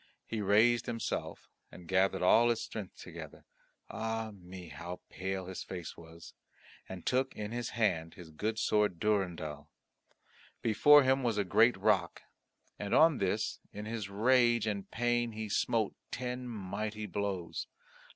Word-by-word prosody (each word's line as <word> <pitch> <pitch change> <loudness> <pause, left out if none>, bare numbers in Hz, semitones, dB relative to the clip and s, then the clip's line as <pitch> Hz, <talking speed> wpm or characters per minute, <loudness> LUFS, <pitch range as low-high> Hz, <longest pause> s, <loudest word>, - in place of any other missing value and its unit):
He 110 -2 -3
raised 110 +4 +4
himself 115 -1 -4 0.2
and 90 - -12
gathered 95 0 +2
all 115 +6 +6
his 115 - +1
strength 105 -4 -7
together - - -10 0.4
ah 110 0 -3
me! 90 -2 -11
how 85 +5 -7
pale 95 0 -4
his 95 0 -6
face 90 -3 -6
was! 85 0 -13 0.6
and 95 -2 -8
took 130 +1 +1
in 105 0 -5
his 120 0 -3
hand 85 -7 +1
his 85 -3 -11
good 110 +8 -2
sword 105 -6 +1
Durendal. 85 -8 -1 0.9
Before 145 +6 +7
him 130 +1 +3
was 115 -4 0
a 100 - +2
great 110 +6 +4
rock 95 -6 +1 0.6
and 100 - -1
on 160 -3 +6
this 100 +2 -1
in 105 +1 -7
his 110 -2 -4
rage 120 +2 +3
and 100 -3 -3
pain 120 0 0
he 110 0 -4
smote 110 +1 +1 0.2
ten 125 +1 -4
mighty 105 0 -4
blows. 95 -2 -3
105 Hz, 145 wpm, -32 LUFS, 95-115 Hz, 0.9 s, Before